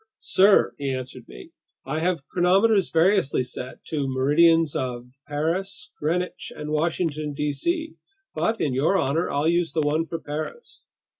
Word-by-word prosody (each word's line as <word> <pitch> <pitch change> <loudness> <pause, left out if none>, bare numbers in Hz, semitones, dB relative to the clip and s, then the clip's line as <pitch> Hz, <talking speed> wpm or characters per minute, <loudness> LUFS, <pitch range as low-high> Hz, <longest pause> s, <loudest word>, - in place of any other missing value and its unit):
"Sir," 195 +2 +4
he 140 -1 -2
answered 130 -1 -8
me, 60 0 -12 0.3
"I 150 +4 -2
have 165 -4 -1
chronometers 190 +4 +3
variously 165 -5 +2
set 125 0 -8
to 155 -2 -1
the 135 - -1
meridians 150 +4 +3
of 125 -1 -4 0.2
Paris, 180 - -3
Greenwich, 175 +4 -2
and 150 0 -6
Washington, 155 -1 -1
D.C. 230 - -2 0.4
But 225 0 -1
in 140 - 0
your 150 +9 +2
honor, 160 +1 0
I'll 145 +2 0
use 170 0 +1
the 160 - +1
one 155 +2 +1
for 165 - -4
Paris." 155 - -7
155 Hz, 150 wpm, -24 LUFS, 140-180 Hz, 0.4 s, Sir